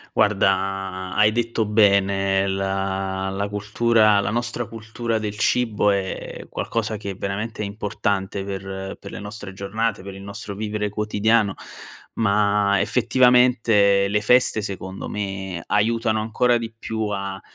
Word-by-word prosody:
Guarda, 95 -2 +1
hai 105 0 +5
detto 115 0 0
bene 100 -2 +3
la 95 0 -2
la 100 +1 -2
cultura, 105 +1 +3
la 100 - -1
nostra 120 +1 -2
cultura 115 +1 -3
del 105 -1 -4
cibo 105 -2 +2
è 100 -1 -4
qualcosa 110 -1 -2
che 100 -1 -5
è - - -7
veramente 105 +3 -3
importante, 100 -1 -2
per 95 0 -6
per - - -10
le - - -7
nostre 105 -1 -7
giornate, 100 +1 -2
per 100 0 -8
il 95 - -10
nostro 100 0 -7
vivere 105 0 -2
quotidiano, 105 0 +1 0.6
ma 100 -1 +2
effettivamente 120 -5 +4
le 105 +1 +1
feste 125 0 +3
secondo 95 -1 -6
me 95 -4 -4
aiutano 110 +1 +1
ancora 120 +2 +2
di 115 -1 -6
più 110 -1 -3
a 100 -1 -4
105 Hz, 135 wpm, -22 LUFS, 95-110 Hz, 0.6 s, hai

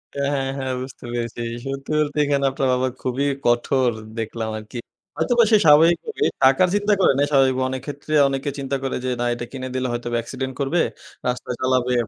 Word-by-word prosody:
হ্যাঁ, 140 0 0
হ্যাঁ, 135 -1 -1
হ্যাঁ। 130 -1 -3
বুঝতে 130 -1 -9
পেরেছি, 120 -1 -3 0.2
সত্যি 135 +1 -5
বলতে, 150 0 -1
এখানে 140 -1 +1
আপনার 135 0 -1
বাবা 125 +1 +1
খুবই 130 +2 -1 0.2
কঠোর 120 +1 +2 0.3
দেখলাম 115 0 -3
আরকি। 110 +3 -9 0.4
হয়তোবা 240 -1 +3
সে 215 - +7
স্বাভাবিকভাবে 170 - +4 0.2
টাকার 135 +7 +5
চিন্তা 205 +1 +2
করে 185 - +5
নাই, 140 - +3
স্বাভাবিক 135 -2 +4
অনেক 130 0 -4
ক্ষেত্রে 145 +1 -6
অনেকে 135 +1 -2
চিন্তা 140 0 -2
করে 135 - -2
যে, - - 0
না 120 - 0
এটা 120 0 -5
কিনে 130 -1 -5
দিলে 130 0 0
হয়তোবা 120 0 -3
অ্যাক্সিডেন্ট 130 +3 -4
করবে 140 +5 +1 0.5
রাস্তা 125 0 -3
চালাবে 130 -1 +1
135 Hz, 185 wpm, -22 LUFS, 125-140 Hz, 0.5 s, সে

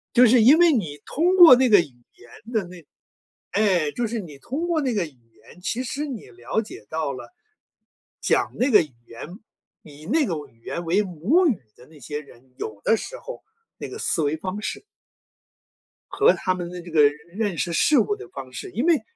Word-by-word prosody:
就 250 0 +7
是 240 +1 +5
因 265 +8 +7
为 345 -2 +5
你 160 - -2
通 355 +5 +1
过 340 -8 +10
那 255 0 +2
个 205 -3 +7
语 - - +2 0.3
言 220 - -15
的 215 -4 0
那 175 -3 -13 0.7
哎， 185 -8 +2
就 240 +6 -2
是 230 +1 -3
你 160 -8 -9
通 290 - -4
过 335 -3 +1
那 260 -4 -1
个 200 -5 0
语 - - -10 0.3
言， 180 - -18
其 235 +7 -2
实 280 +4 -4
你 260 -7 -7
了 120 - -3
解 205 - -11
到 160 -2 -2
了， 135 - -10 0.9
讲 - - +1
那 260 +3 +1
个 215 - +7
语 150 -5 -8
言， 115 - -9 0.6
以 150 0 -14
那 305 - +2
个 170 -8 -2
为 150 - -10
语 115 0 -30
言 170 - -4
为 180 +5 +2
母 205 - +1
语 245 - 0
的 125 - -17
那 155 -1 -17
些 145 +4 -6
人， 130 -3 -20
有 105 -2 -7
的 - - +4
时 - - -7
候 - - -9 0.4
那 - - -7
个 415 - -8
思 170 - 0
维 145 0 0
方 190 +5 -5
式 - - -5 1.3
和 430 +4 +4
他 185 - -1
们 175 -1 -5
的 180 0 -8
这 170 0 -11
个 155 -2 +5
认 145 0 +5 0.2
认 200 -1 -3
识 170 - -1
事 290 - +3
物 210 -3 +2
的 - - -10
方 130 0 -9
式。 - - -7
因 230 - -2
为， 335 -4 +3
195 Hz, 230 characters per minute, -23 LUFS, 155-255 Hz, 1.3 s, 过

